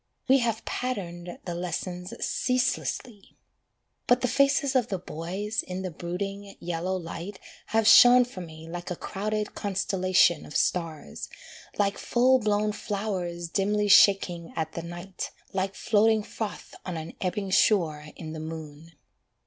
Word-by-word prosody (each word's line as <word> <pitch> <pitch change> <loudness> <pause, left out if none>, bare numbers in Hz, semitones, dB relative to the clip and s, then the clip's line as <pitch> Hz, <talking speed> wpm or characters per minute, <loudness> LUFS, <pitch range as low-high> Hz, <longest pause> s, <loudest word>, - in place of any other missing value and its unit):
We 270 +1 +6
have 230 -2 -1
pattered 175 -8 -4
the 175 - -3
lessons 180 +1 -4
ceaselessly 250 -4 -1 0.7
But 245 0 +4
the 250 - +2
faces 275 +1 +2
of 245 -3 +3
the 195 - -2
boys, 185 +6 -3
in 185 +1 -5
the 185 - -3
brooding, 195 +4 -5
yellow 175 +2 -2
light 180 +2 -6 0.3
Have 225 -1 +2
shone 245 +2 +9
for 240 -7 -9
me 160 -1 -10
like 175 +1 -6
a 180 - -2
crowded 210 +4 -3
constellation 185 -4 +2
of - - -3
stars, 160 - -2 0.5
Like 200 -1 +1
full 255 +2 +3
blown 210 -1 +1
flowers 190 -5 -3
dimly 205 +3 +1
shaking 185 -4 +5
at 160 -1 -2
the 170 - -5
night, 175 +3 -6 0.2
Like 190 0 -1
floating 220 0 +3
froth 215 0 -6
on 180 -3 -4
an 160 0 -6
ebbing 190 +1 -2
shore 160 -8 +3
in 160 -2 -7
the 160 - -6
moon. 160 0 -8
190 Hz, 140 wpm, -27 LUFS, 170-210 Hz, 0.7 s, shone